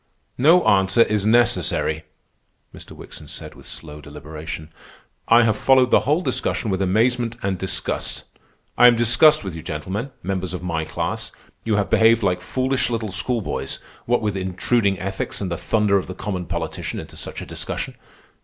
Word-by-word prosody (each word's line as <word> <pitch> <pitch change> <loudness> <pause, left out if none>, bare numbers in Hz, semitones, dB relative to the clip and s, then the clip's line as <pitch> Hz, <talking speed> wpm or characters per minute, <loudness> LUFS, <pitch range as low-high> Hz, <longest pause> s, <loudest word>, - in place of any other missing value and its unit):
"No 165 +7 +5
answer 95 +3 +4
is 105 -2 0
necessary," 110 -8 +2 0.7
Mr. - - -11
Wickson - - -11
said - - -8
with - - -12
slow 75 -2 -8
deliberation. 75 +2 -8 0.5
"I 115 +1 +6
have 110 -2 +2
followed 130 +2 +4
the - - +6
whole 155 +4 +3
discussion 110 - -1
with 95 0 -1
amazement 115 +4 +1
and 95 -1 0
disgust. 95 -1 -3 0.6
I 125 - +9
am 120 - +6
disgusted 120 +6 +5
with 95 -4 -5
you 80 - -6
gentlemen, 95 - -4
members 95 -1 -3
of 90 - -7
my 80 -3 -2
class. 75 0 -3 0.3
You 110 -2 +1
have 100 -1 0
behaved 115 0 +5
like 90 -2 +1
foolish 130 0 0
little 115 -3 -2
schoolboys, 115 +3 -2 0.3
what 120 -1 +2
with 105 -2 -1
intruding 95 +2 0
ethics 95 +1 -3
and 95 -3 -3
the - - 0
thunder 105 -1 +2
of - - -7
the 90 - -7
common 95 -3 -4
politician - - -4
into - - -10
such - - -5
a - - -7
discussion. - - -4
100 Hz, 170 wpm, -22 LUFS, 90-120 Hz, 0.7 s, I